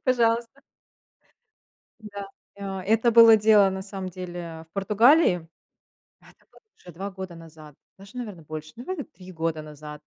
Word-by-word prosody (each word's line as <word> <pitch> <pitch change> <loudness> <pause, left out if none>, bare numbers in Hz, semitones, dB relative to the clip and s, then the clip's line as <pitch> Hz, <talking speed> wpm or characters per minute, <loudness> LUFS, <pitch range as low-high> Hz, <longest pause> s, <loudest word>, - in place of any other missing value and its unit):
пожалуйста. 235 0 +1 1.4
Да. 205 -2 -8 0.3
И 200 - -14
о 195 -1 -4
Это 225 +5 +2
было 230 -1 +9
дело, 210 -2 +5
на 190 0 -5
самом 190 -1 -6
деле, 175 -2 -8
в - - -59
Португалии. 205 - +3 0.7
Это - - -22
было - - -21 0.2
уже 175 - -14
2 195 +4 -6
года 190 -2 -8
назад, 155 -3 -14 0.2
даже, 195 +5 -13
наверно, 210 -8 -7
больше. 155 0 -8
Наверно, 290 +6 -5
3 185 - -14
года 165 -2 -2
назад. 150 0 -10
195 Hz, 150 wpm, -25 LUFS, 165-225 Hz, 1.4 s, было